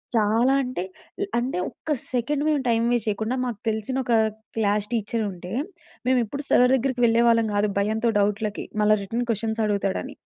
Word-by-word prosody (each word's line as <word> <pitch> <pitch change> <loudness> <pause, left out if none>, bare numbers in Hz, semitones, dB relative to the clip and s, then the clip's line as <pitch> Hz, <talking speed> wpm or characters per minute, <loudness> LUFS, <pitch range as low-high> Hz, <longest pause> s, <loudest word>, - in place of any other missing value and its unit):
చాలా 225 +4 +3
అంటే, 250 -8 -3 0.5
అంటే 245 -4 -1
ఒక్క 315 - -7 0.2
సెకండ్ 275 +4 0
మేము 305 -2 +2
టైం 230 -1 +3
వేస్ట్ 240 -3 0
చేయకుండా, 220 +4 -1
మాకు 235 -4 -4
తెల్సినొక 240 +4 -1 0.5
క్లాష్ 210 -1 +1
టీచరుంటే, 205 -5 -3 0.6
మేమెప్పుడు 255 +2 +1
సార్ 250 - +6
దెగ్గరికి 260 -1 0
వెళ్ళేవాళ్ళం 230 0 +4
గాదు, 205 +1 +2
భయంతో 220 +3 +1
డౌట్‌లకి. 210 +1 -1 0.2
మళ్ళా 215 0 +5
రిటర్న్ 230 +5 -2
క్వషన్సడుగుతాడని... 215 -3 -1
225 Hz, 135 wpm, -24 LUFS, 210-245 Hz, 0.6 s, సార్